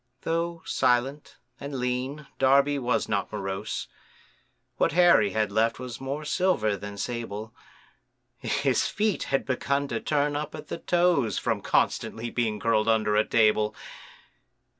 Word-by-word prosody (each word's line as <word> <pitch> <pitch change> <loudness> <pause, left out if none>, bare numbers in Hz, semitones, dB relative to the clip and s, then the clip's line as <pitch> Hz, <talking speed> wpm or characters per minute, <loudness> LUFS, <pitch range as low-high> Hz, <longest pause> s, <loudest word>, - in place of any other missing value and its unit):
Though 165 0 -2
silent 130 +3 0 0.2
and 140 0 -6
lean, 130 +4 -2
Darby 140 +2 +4
was 125 -1 0
not - - -1
morose, 95 0 -4 0.9
What - - +2
hair 175 -4 +6
he 105 - +1
had 105 +1 -1
left 110 +2 +1
was 125 -1 -7
more 140 +3 -4
silver 150 - +1
than 100 +1 -8
sable, 110 -1 -5 0.9
His - - +1
feet 210 -2 -1
had 135 - 0
begun 140 +2 -1
to 115 - -2
turn 145 +1 0
up 150 +1 -4
at 155 - -10
the - - -4
toes, 175 -10 +2
From - - -1
constantly 115 +1 0
being 110 -3 -1
curled 110 0 +1
under 110 -2 +2
a 105 - +4
table. 110 -1 +2
125 Hz, 140 wpm, -26 LUFS, 110-145 Hz, 0.9 s, hair